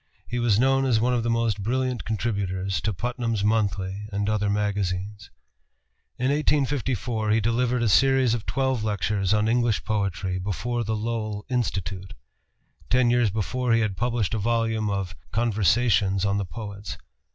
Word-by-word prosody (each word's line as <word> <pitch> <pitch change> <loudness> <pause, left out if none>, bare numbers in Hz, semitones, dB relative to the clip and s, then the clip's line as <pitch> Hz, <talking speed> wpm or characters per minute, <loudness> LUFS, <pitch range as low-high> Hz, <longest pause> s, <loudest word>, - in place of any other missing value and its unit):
He 120 - -2
was 115 -4 +3
known 135 +1 +3
as 120 -4 +3
one 125 +3 +2
of 120 - +1
the 120 - -1
most 115 -3 0
brilliant 125 +3 -1
contributors 100 -4 -2
to 110 - 0
Putnam's 115 +1 -2
Monthly 100 -2 0
and 100 0 -1
other 105 -1 +1
magazines. 100 -1 -2 0.9
In 130 +2 +1
1854 130 -7 0
he 110 +1 +4
delivered 120 +2 +1
a - - +2
series 130 +3 +4
of 115 -2 -3
twelve 130 -4 0
lectures 105 -2 0
on 105 0 +3
English 120 -2 +1
poetry 100 -3 -1
before 120 +5 -2
the 110 0 -1
Lowell 110 -1 -3
Institute. 95 -5 -2 0.7
Ten 125 -1 +4
years 120 -3 +3
before 115 +4 -1
he 115 - +4
had 105 -4 -1
published 120 -2 -1
a 110 - 0
volume 115 0 0
of 95 -5 -3 0.2
"Conversations 105 -3 +2
on 100 0 +1
the 100 - -2
Poets." 100 0 -7
110 Hz, 155 wpm, -25 LUFS, 100-120 Hz, 0.9 s, he